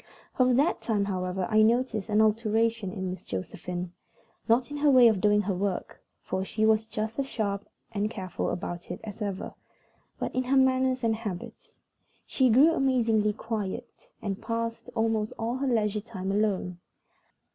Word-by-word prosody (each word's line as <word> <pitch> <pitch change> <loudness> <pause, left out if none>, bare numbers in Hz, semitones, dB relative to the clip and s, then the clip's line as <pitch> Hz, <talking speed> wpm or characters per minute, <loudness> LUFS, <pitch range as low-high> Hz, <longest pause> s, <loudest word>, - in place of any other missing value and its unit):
From 255 -1 +4
that 290 +7 +2
time, 210 -3 0
however, 185 -1 -2
I 215 -1 +4
noticed 230 -1 +2
an 210 +1 +4
alteration 220 -1 +1
in 190 -2 -3
Miss 185 - -7
Josephine; 175 - -5 0.6
not 245 +4 +3
in 290 - -4
her 295 0 +3
way 255 -3 +8
of 215 -5 +2
doing 210 0 +4
her 200 0 -1
work, 190 +1 -3 0.2
for 190 0 -2
she 215 +3 0
was 220 0 +3
just 220 +3 -4
as 275 - 0
sharp 200 -5 -3 0.2
and 210 -1 -1
careful 190 -5 -4
about 175 0 -5
it - - -5
as 215 0 -8
ever, 200 -2 -3 0.6
but - - -3
in 255 0 0
her 270 +2 +2
manners 260 -1 +3
and 225 -1 +2
habits. 210 -6 -7 0.5
She 260 -2 +2
grew 270 +8 +6
amazingly 230 -7 +2
quiet, 225 +1 -5
and 200 -2 -3
passed 230 +1 -3
almost 225 -1 0
all 235 +3 -2
her 275 +1 -1
leisure 215 -4 +1
time 190 -3 -5
alone. 195 -4 0
220 Hz, 170 wpm, -28 LUFS, 200-240 Hz, 0.6 s, way